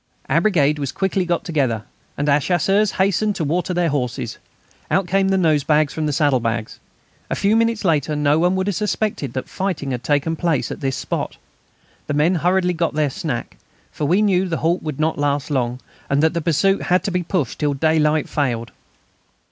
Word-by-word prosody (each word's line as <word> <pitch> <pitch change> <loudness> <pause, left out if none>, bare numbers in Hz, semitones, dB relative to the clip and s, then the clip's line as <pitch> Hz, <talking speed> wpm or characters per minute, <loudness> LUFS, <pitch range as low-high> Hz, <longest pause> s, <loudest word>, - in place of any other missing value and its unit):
Our 160 +5 +2
brigade 150 -7 +2
was 140 -2 -2
quickly 190 -1 0
got 175 -1 -1
together, 130 -10 0 0.3
and 145 - -1
our 145 0 +4
Chasseurs 195 +6 +1
hastened 200 +2 +1
to 165 - -2
water 170 +5 -1
their 175 -1 +1
horses. 125 -5 -3 0.5
Out 190 - +2
came 195 +2 +1
the 195 - +2
nosebags 155 -3 +2
from 155 -1 -2
the - - 0
saddlebags. 120 -7 0 0.5
A - - -1
few 205 +2 +2
minutes 230 -2 +1
later 155 -3 +1
no 145 +1 +2
one 180 +2 +2
would 190 0 0
have 205 -2 -1
suspected 210 - -2
that 130 - -4
fighting 185 -8 -3
had 125 -1 -4
taken 145 +2 +1
place 165 -3 0
at - - -6
this 135 -1 -1
spot. - - -4 0.7
The 145 - -1
men 155 +5 +3
hurriedly 180 0 +2
got 165 -3 -1
their 150 -2 +1
snack, - - -4 0.3
for 150 - -3
we 185 +8 +3
knew 190 -2 +2
the 165 - -1
halt 170 +2 +2
would 155 -3 -5
not 155 -1 0
last 145 +1 0
long, 125 -2 -1 0.3
and 140 +2 +2
that 160 - +3
the 170 - -1
pursuit 170 +5 +2
had 180 0 +1
to 200 - -2
be 180 0 0
pushed 175 - -2
till 145 -2 0
daylight 155 0 +2
failed. 120 -6 -2
160 Hz, 195 wpm, -20 LUFS, 145-185 Hz, 0.7 s, our